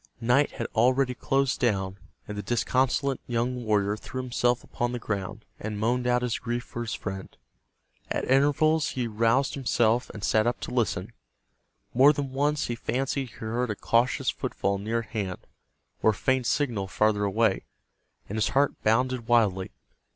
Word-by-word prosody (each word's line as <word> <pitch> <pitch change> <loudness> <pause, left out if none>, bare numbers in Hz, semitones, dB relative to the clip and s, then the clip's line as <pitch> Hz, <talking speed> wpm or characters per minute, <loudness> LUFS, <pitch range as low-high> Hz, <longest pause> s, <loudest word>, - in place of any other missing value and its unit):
Night 125 +5 +2
had - - -4
already 125 +3 +3
closed 135 +1 0
down, 95 -5 0 0.3
and 105 - -5
the 105 - -3
disconsolate 130 +5 +1
young 120 +1 -1
warrior 105 -2 +1
threw 130 +4 -7
himself 125 -1 0
upon 120 0 -3
the - - -1
ground, 105 -1 -4
and 105 0 -4
moaned 120 +3 0
out 125 0 +2
his 120 -2 -1
grief 120 +1 -3
for 120 - -7
his 115 -1 -3
friend. 95 -1 -6 0.7
At - - -1
intervals 145 +4 +3
he 125 -2 -1
roused 115 +5 +2
himself, 120 -3 +1
and 105 - -9
sat 110 +1 +3
up 120 - 0
to - - -5
listen. 120 -5 -1 0.8
More 135 +4 +7
than 140 -2 -3
once 145 +3 +1
he 120 - -2
fancied 130 +3 -2
he - - -17
heard 115 +2 -2
a 105 - -1
cautious 120 +5 +1
footfall 100 0 -2
near 115 +3 -1
at 115 - -14
hand, 100 -6 -4 0.6
or - - +5
a - - +3
faint 130 +4 +1
signal 115 -10 0
farther 105 +1 +1
away, 105 0 +1 0.6
and 105 - -4
his 110 - +2
heart 140 +2 +1
bounded 120 +2 +1
wildly. 105 -6 +2
120 Hz, 170 wpm, -27 LUFS, 110-130 Hz, 0.8 s, More